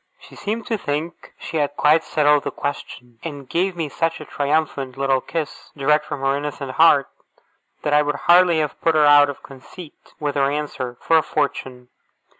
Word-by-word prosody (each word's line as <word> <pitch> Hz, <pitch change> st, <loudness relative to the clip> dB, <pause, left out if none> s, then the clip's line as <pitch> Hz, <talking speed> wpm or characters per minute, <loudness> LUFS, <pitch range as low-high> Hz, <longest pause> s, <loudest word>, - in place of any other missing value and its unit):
She -, -, -16 dB
seemed 215 Hz, +2 st, -4 dB
to 225 Hz, -3 st, -2 dB
think 150 Hz, +3 st, -5 dB
she 160 Hz, -, -5 dB
had 145 Hz, -1 st, -1 dB
quite 155 Hz, +2 st, +3 dB
settled 150 Hz, -1 st, +2 dB
the -, -, -2 dB
question, 125 Hz, -4 st, -6 dB
and 145 Hz, -5 st, -7 dB
gave 180 Hz, +4 st, -1 dB
me 165 Hz, -3 st, -3 dB
such 165 Hz, +3 st, -2 dB
a 155 Hz, -, -9 dB
triumphant 145 Hz, -3 st, -2 dB
little 135 Hz, -1 st, +1 dB
kiss, 160 Hz, 0 st, -5 dB
direct 150 Hz, +2 st, +2 dB
from 145 Hz, -2 st, -5 dB
her 135 Hz, 0 st, +1 dB
innocent 140 Hz, -2 st, -5 dB
heart, 145 Hz, -1 st, +4 dB, 0.8 s
that 150 Hz, -, 0 dB
I 150 Hz, -, +5 dB
would 150 Hz, 0 st, -1 dB
hardly 175 Hz, -1 st, +5 dB
have 150 Hz, -, -4 dB
put 165 Hz, -1 st, +2 dB
her 150 Hz, -1 st, +5 dB
out 145 Hz, 0 st, +6 dB
of 140 Hz, -, -8 dB
conceit 145 Hz, +5 st, -14 dB
with 145 Hz, -1 st, -2 dB
her 140 Hz, -1 st, +1 dB
answer, 140 Hz, -4 st, -4 dB
for 165 Hz, -, +3 dB
a -, -, +4 dB
fortune. 130 Hz, -5 st, -3 dB
150 Hz, 190 wpm, -21 LUFS, 140-160 Hz, 0.8 s, out